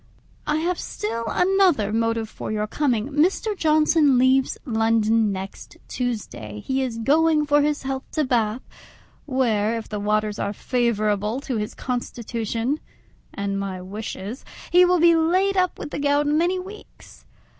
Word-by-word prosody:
I 300 - +1
have 340 +3 -1
still 230 +2 -4
another 360 - +2
motive 230 0 0
for - - -7
your 210 0 -1
coming: 245 0 -1
Mr. 365 - +1
Johnson 310 -4 +3
leaves 260 +1 +3
London 225 -2 +2
next 190 0 -7
Tuesday; 210 - -4
he 265 0 -1
is 250 -3 -3
going 300 +5 +3
for 290 0 +3
his 295 0 0
health 265 0 -4
to 310 - +1
Bath, 235 -2 0 0.6
where, 230 -5 +1
if 225 - -7
the 210 - -4
waters 210 0 0
are 200 - -2
favourable 215 -1 0
to 260 -4 -3
his 210 0 -4
constitution 240 +1 -3 0.5
and 200 -1 -3
my 195 -2 -4
wishes, 205 +4 -6 0.3
he 360 +1 +7
will 360 0 +3
be 340 +1 +6
laid 365 +5 +2
up 365 -1 +1
with 295 - -7
the - - -4
gout 290 +1 +2
many 335 +5 +2
weeks. 385 +4 -12
250 Hz, 150 wpm, -23 LUFS, 215-305 Hz, 0.6 s, he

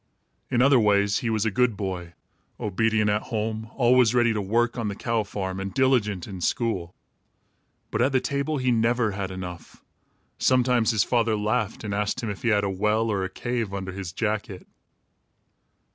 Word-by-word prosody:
In 120 0 +3
other 135 -2 +6
ways, 100 -1 +3
he 120 - -2
was 110 -1 0
a 110 - +1
good 120 -1 +1
boy, 90 -4 -4 0.5
obedient 110 +1 +1
at 105 +1 +1
home, 110 0 -3
always 125 -2 +4
ready 120 -2 +4
to 105 - -1
work 120 +5 +1
on 115 -3 -2
the 100 - -3
cow 115 +1 -1
farm, 95 -2 -4
and 95 0 -4
diligent 105 -7 +1
in 95 -3 -7
school. 95 -4 -1 1.0
But - - 0
at 130 +3 +3
the 130 - +3
table 140 +4 -2
he 130 -1 +1
never 115 -1 +2
had 100 -1 -4
enough. 90 -3 -8 0.6
Sometimes 125 -3 +3
his 110 -4 +3
father 115 -3 +1
laughed 110 +4 -1
and 105 -2 -3
asked 105 +5 -1
him 110 - -2
if 100 - -8
he - - -2
had 105 -2 +3
a - - +1
well, 105 +3 +1
or 100 -2 0
a 95 - -3
cave, 115 0 -3
under 95 -1 -4
his 95 -2 -6
jacket. 105 -2 -3
110 Hz, 185 wpm, -25 LUFS, 100-120 Hz, 1.0 s, other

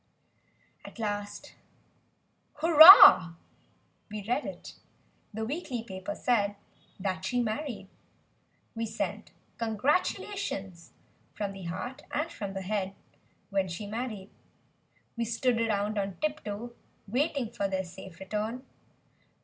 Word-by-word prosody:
At - - -12
last 205 -2 -5 1.0
"Hurrah!" 315 - +9 0.7
We 210 -1 -6
read 250 +5 -1
it. - - -9 0.6
The 220 +1 -4
weekly 265 -3 -4
paper 195 -1 -6
said. 205 -4 +1 0.4
That 185 -1 -3
she 245 +6 -1
married! 230 -2 -3 0.9
We 230 0 -3
sent - - -4 0.3
congratulations, 230 - -2 0.4
from 205 -2 -3
the 195 -2 -9
heart 245 - -6
and 310 +3 -2
from 200 -2 -6
the 190 - -4
head— 195 -1 -3 0.6
When 195 -1 0
she 180 +4 -6
married; 215 -2 -5 0.8
We 235 - -2
stood 235 +1 0
around 210 -1 0
on 195 -2 -3
tip 305 0 -2
toe, 220 +3 -6 0.3
waiting 265 +1 -1
for 200 -4 -2
their 190 -1 -2
safe 180 -1 -12
return. 215 +6 -4
215 Hz, 115 wpm, -29 LUFS, 195-245 Hz, 1.0 s, Hurrah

